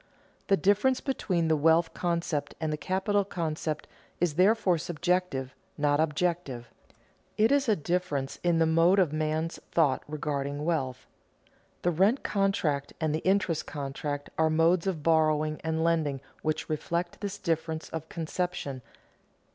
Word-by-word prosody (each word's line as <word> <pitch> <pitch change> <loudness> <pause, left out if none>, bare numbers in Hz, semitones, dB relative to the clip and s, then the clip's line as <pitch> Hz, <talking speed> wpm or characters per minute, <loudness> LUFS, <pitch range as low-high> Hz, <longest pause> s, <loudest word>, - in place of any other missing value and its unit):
The 195 - +4
difference 205 - +3
between 185 - -1
the 160 - +3
wealth 160 +2 +3
concept 170 -4 -2
and 160 -2 -1
the - - -2
capital 195 +4 0
concept 160 -4 -3 0.3
is 175 -3 +1
therefore 185 0 +3
subjective, 170 -5 -1 0.2
not 145 0 +2
objective; 155 -6 -1 0.7
it 220 +3 +4
is 280 -3 +3
a 215 - +5
difference 150 -5 -2
in 175 -1 +2
the 165 - +4
mode 165 +4 +4
of 175 -6 +3
man's 155 +1 -1
thought 145 -6 +3
regarding 145 -1 -3
wealth. 135 -7 -1 0.8
The 175 - +3
rent 195 - +2
contract 175 -8 0
and 155 -2 0
the 155 - 0
interest 185 -3 +1
contract 145 0 -4
are 160 0 +4
modes 165 +3 +3
of 165 -6 -2
borrowing 155 -1 +2
and 160 0 0
lending 160 -5 +1 0.2
which 155 0 -1
reflect 170 +3 -2
this 205 -1 -4
difference 160 -1 -2
of 160 0 -6
conception. 165 -5 -3
160 Hz, 140 wpm, -28 LUFS, 150-180 Hz, 0.8 s, a